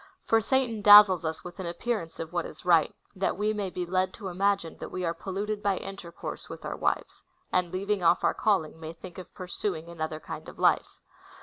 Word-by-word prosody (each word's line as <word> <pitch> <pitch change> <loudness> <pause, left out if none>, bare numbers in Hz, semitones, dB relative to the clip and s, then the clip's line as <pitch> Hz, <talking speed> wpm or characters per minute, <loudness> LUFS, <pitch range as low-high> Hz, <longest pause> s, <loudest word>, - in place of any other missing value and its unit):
For 225 0 +3
Satan 235 -2 0
dazzles 205 -3 +9
us 160 0 -3
Avith 180 +1 -10
an 185 - -4
appearance 170 -2 -3
of 165 0 -5
AA'hat 175 -1 -1
is 155 - -11
right, 170 -3 +4 0.2
that 190 0 -1
we 210 +1 +1
may 205 -3 -2
be 180 0 -4
led 185 +1 0
to 200 -4 -6
imagine 195 -2 0
that - - -6
we 185 -1 -3
are 165 - 0
polluted 200 +4 -4
by 200 -2 +1
intercourse 190 -3 -7
Avith - - -9
our - - -3
Avivcs, - - -2 0.3
and 180 -2 +1
leaA'ing 200 +1 -1
off 170 +1 +4
our - - +3
calling, 175 -7 0
may 160 0 -7
think 175 +2 -10
of 185 - -10
pur 185 - -7
suing 170 -2 -3
another 160 -2 -4
kind - - -8
of - - -13
life. - - +2
185 Hz, 215 wpm, -28 LUFS, 170-205 Hz, 0.3 s, dazzles